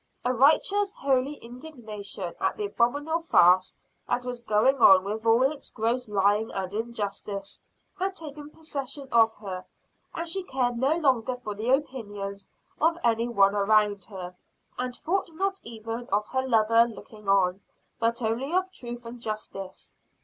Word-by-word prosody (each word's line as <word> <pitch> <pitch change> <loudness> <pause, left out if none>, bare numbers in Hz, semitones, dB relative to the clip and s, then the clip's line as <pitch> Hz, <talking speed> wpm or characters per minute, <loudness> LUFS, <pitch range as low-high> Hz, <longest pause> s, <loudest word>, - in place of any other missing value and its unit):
A 250 - +2
righteous, 385 - +3
holy 270 +1 +1
indignation 230 - -6
at - - 0
the 210 - -2
abominable 285 +10 0
farce 185 - +5 0.4
that 245 0 0
was 245 -1 -4
going 235 +4 +3
on 190 -7 +7
with 215 +3 -4
all 230 +3 +5
its 275 +2 -1
gross 235 +1 -1
lying 205 +2 +2
and 190 0 -3
injustice 205 -3 -4 0.4
had 380 +1 -1
taken 300 -3 -7
possession 285 -3 -6
of 225 -1 +5
her, 190 -3 -6 0.5
and 335 +1 -3
she 385 +4 -2
cared 250 -7 -1
no 275 +5 +3
longer 260 -6 +1
for 235 -4 -6
the 215 +4 -3
opinions 205 -8 -2 0.3
of 330 +2 +3
any 230 0 +2
one 200 -4 +4
around 205 -1 +2
her, 180 -3 -8 0.4
and 250 0 -3
thought 370 +7 -1
not 390 +3 -1
even 230 +1 -7
of 205 +1 +2
her 260 0 -1
lover 230 0 +4
looking 215 -2 -10
on, 190 -1 +3 0.4
but 235 +1 +1
only 235 +6 -1
of 370 +1 +1
truth 240 -3 -7
and 235 +1 -9
justice. 215 -4 -5
235 Hz, 155 wpm, -27 LUFS, 210-270 Hz, 0.5 s, on